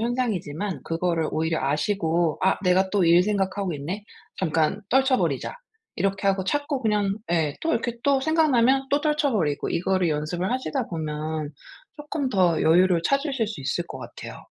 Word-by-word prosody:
현상이지만 210 - -2
그거를 165 -1 -1
오히려 160 +1 0
아시고 165 +1 0
'아 190 - +3
내가 190 +1 +3
또 200 -4 +2
일 170 +1 +6
생각하고 195 -1 -1
있네. 175 +9 -5 0.3
잠깐 160 +2 +1
떨쳐 265 +1 +4
버리자.' - - -1 0.4
이렇게 195 0 -1
하고 190 -1 +1
자꾸 285 +5 -1
그냥 205 -2 +1 0.2
예 155 -4 +1
또 325 - 0
이렇게 235 +1 -1
또 275 -1 +3
생각나면 270 -4 +3
또 285 - +2
떨쳐 300 -3 +1
버리고 150 -9 0
이거를 185 0 +1
연습을 160 +6 -2
하시다 260 0 -2
보면 155 -2 -4 0.5
쪼끔 295 -2 -3
더 180 -8 +2
여유를 175 +2 +4
찾으실 275 -4 0
수 215 - -6
있을 140 +6 -2
것 - - -7
같아요. - - -9
190 Hz, 350 characters per minute, -24 LUFS, 165-250 Hz, 0.5 s, 일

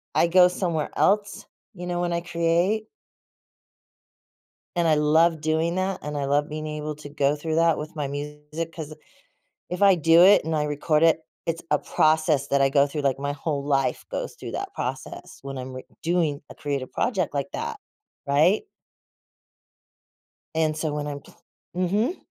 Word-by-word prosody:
I - - +4
go 180 +1 +6
somewhere 170 -4 -2
else, 205 0 +1 0.3
you 180 -1 -7
know, 175 0 -2
when 175 -1 -1
I 170 - -1
create. 175 +6 0 1.9
And 170 -1 +2
I 155 - +5
love 160 +2 +3
doing 160 +2 0
that, 190 +1 -1
and 150 0 -4
I 140 -1 -1
love 145 +2 +1
being 155 0 -5
able 150 0 -4
to 150 -1 -10
go 145 0 +1
through 155 +1 -3
that 165 -1 +4
with 155 +2 -7
my 145 -2 -1
music, 150 +3 -6
'cause 155 -2 -7 0.8
if 180 +2 -4
I 195 -2 +7
do 165 +1 +6
it 195 -3 +6
and 160 - -1
I 150 - +1
record 150 +1 +1
it, 165 0 +5 0.3
it's 165 0 -2
a 150 - +4
process 155 -3 +2
that 140 0 +2
I 135 - +4
go 140 +1 +4
through, 150 +1 -4
like, 135 -1 0
my 140 0 -2
whole 145 -1 -3
life 135 -2 0
goes - - -4
through - - -8
that - - -5
process - - -6
when 135 -1 -6
I'm 130 0 -6
re 130 - -7 0.2
doing 165 -4 0
a - - -11
creative 140 -3 -3
project 195 - -1
like 140 -1 -2
that. - - -4 0.5
Right? 150 +8 +3 1.9
And 155 -1 +1
so 155 -1 -2
when 150 0 -3
I'm 145 -1 -5
pl - - -18 0.4
mhm. 205 - 0
155 Hz, 175 wpm, -25 LUFS, 145-170 Hz, 1.9 s, I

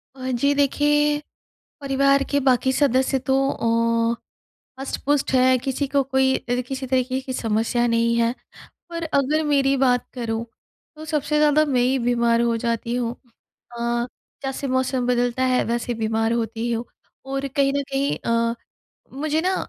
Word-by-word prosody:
अ, - - -16
जी 280 +4 +2
देखिए, 295 +1 +2 0.6
परिवार 275 0 +2
के 285 - +3
बाकी 260 +1 +3
सदस्य 265 -1 +2
तो 265 - +4 0.3
ओ 230 0 +2 0.7
हष्ट-पुष्ट 275 +1 -1
है, 255 0 +4
किसी 270 +2 -2
को 280 - +4
कोई 265 0 +2
अ, 245 +1 -2
किसी 265 -1 -4
तरीके 255 0 0
की 260 0 -6
समस्या 230 +1 0
नहीं 230 0 +2
है, 235 0 +2 0.6
पर 335 -1 -4
अगर 300 +3 +1
मेरी 275 -2 +2
बात 250 -2 +2
करूँ, 230 -2 -3 0.5
तो 310 - -9
सबसे 300 0 0
ज़्यादा 300 0 +4
मैं 250 - +3
ही 260 +2 +2
बीमार 235 -1 +2
हो 235 -1 +1
जाती 235 0 -1
हूँ। 240 -1 -2 0.6
अ, 235 0 -1 0.4
जैसे 270 +1 -3
मौसम 260 -1 0
बदलता 245 +1 +1
है, 255 -1 +2
वैसे 235 +1 -2
बीमार 225 0 0
होती 230 0 -2
हूँ। 230 +1 -2 0.4
और 275 +1 -2
कहीं 275 -1 +3
न 280 - 0
कहीं 275 +1 0
अ, 230 0 0 0.6
मुझे 310 +2 0
ना, 375 +1 +1
255 Hz, 155 wpm, -22 LUFS, 235-275 Hz, 0.7 s, तो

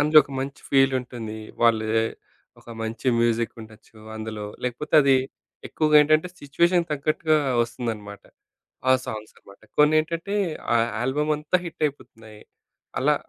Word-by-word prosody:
అందులో 155 +1 +6
ఒక - - -16
మంచి 135 +1 -5
ఫీల్ 135 -1 +4
ఉంటుంది. 120 -3 -7 0.3
వాళ్ళు 110 -2 +3 0.7
ఒక - - -20
మంచి 110 +3 -3
మ్యూజిక్ 115 0 +1
ఉండొచ్చు 110 0 -15 0.2
అందులో 110 -1 -6 0.2
లేకపోతే 125 +6 -3
అది 135 -1 +5 0.5
ఎక్కువగా 155 -1 +3
ఏంటంటే 155 +4 +3
సిచ్యుయేషన్‌కి 170 +4 +1
తగ్గట్టుగా 155 +2 +1 0.3
వస్తుందనమాట. 110 -4 -5 0.7
ఆ - - +8
సాంగ్స్ 110 0 -7
అనమాట. 100 0 -18 0.2
కొనేంటంటే 155 +5 +2 0.4
ఆ - - +5 0.3
ఆల్బమ్ 150 +4 0
అంతా 150 +5 0
హిట్ 170 -2 -8
అయిపోతున్నాయి. 110 -7 -10 0.6
అలా - - +3
135 Hz, 125 wpm, -24 LUFS, 110-150 Hz, 0.7 s, ఆ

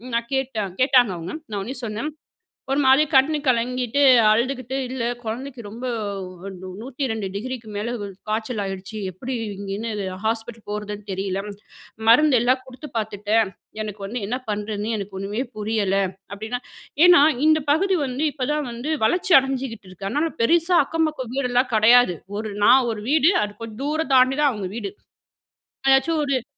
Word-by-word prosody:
நான் 235 0 -1
கேட்டேன் 225 -8 -2
கேட்டாங்க 255 -5 +5
அவங்க 170 +1 -6 0.2
நான் 205 - -2
உடனே 240 +8 -5
சொன்னேன், 220 +6 -3 0.7
ஒரு 280 - +2
மாரி 265 +3 +6
கண்ணு 295 +4 +4
கலங்கிட்டு 250 +2 +1 0.3
அழுதுக்கிட்டு 255 +3 0
"இல்ல 255 -2 -3 0.2
கொழந்தைக்கு 250 +3 -5
ரொம்ப- 235 +5 -8 1.0
102°க்கு 230 -2 -4
மேல 225 +4 -2 0.4
காய்ச்சல் 220 +1 -2
ஆயிடுச்சு. 195 +2 -6
எப்டி 245 +9 -5 0.2
இங்கேன்னு 200 +3 -4 0.4
ஹாஸ்பிட்டல் 225 0 -3
போறதுன்னு 210 0 -5
தெரியல, 195 0 -2 0.7
மருந்தெல்லாம் 255 -1 +5
குடுத்து 260 +4 -10
பாத்துட்டேன். 215 0 0 0.3
எனக்கு 210 -1 -7
வந்து 235 +3 -4
என்ன 250 +3 -1
பண்ணுறதுன்னே 210 +1 -3
எனக்கு 195 -1 -6
ஒண்ணுமே 205 +5 -2
புரியல 210 -2 0 0.4
அப்டினா 220 +4 -4 0.5
ஏனா, 355 -4 +8 0.2
இந்த 315 0 +5
பகுதி 380 +4 +2
வந்து, 260 +4 -2
இப்ப 255 -4 -3
தான் 300 -4 -2
வந்து 240 +6 -5 0.2
வளர்ச்சி 360 - +1
அடைஞ்சுகிட்டு 260 -6 -5
இருக்கு 195 +2 -6
அதனால 300 +7 0
பெருசா 340 +7 +3
அக்கம் 325 -1 +1
பக்கம் 260 -6 -7
வீடெல்லா 250 -1 +2
கிடையாது. 225 -3 +6 0.2
ஒரு 215 0 -4 0.2
நான் 260 -2 +6
ஒரு 210 -1 -6
வீடு 315 +4 +5
அது 205 - -6
கொஞ்சம் 230 +2 -7
தூரம் 300 -1 -1
தாண்டி 255 +1 +5
தான் 285 -3 +4
அவங்க 195 -3 -4
வீடு. 375 +11 -4 1.0
ஏதாச்சும் 270 +4 +4
ஒரு 265 -4 0
240 Hz, 145 wpm, -23 LUFS, 210-270 Hz, 1.0 s, ஏனா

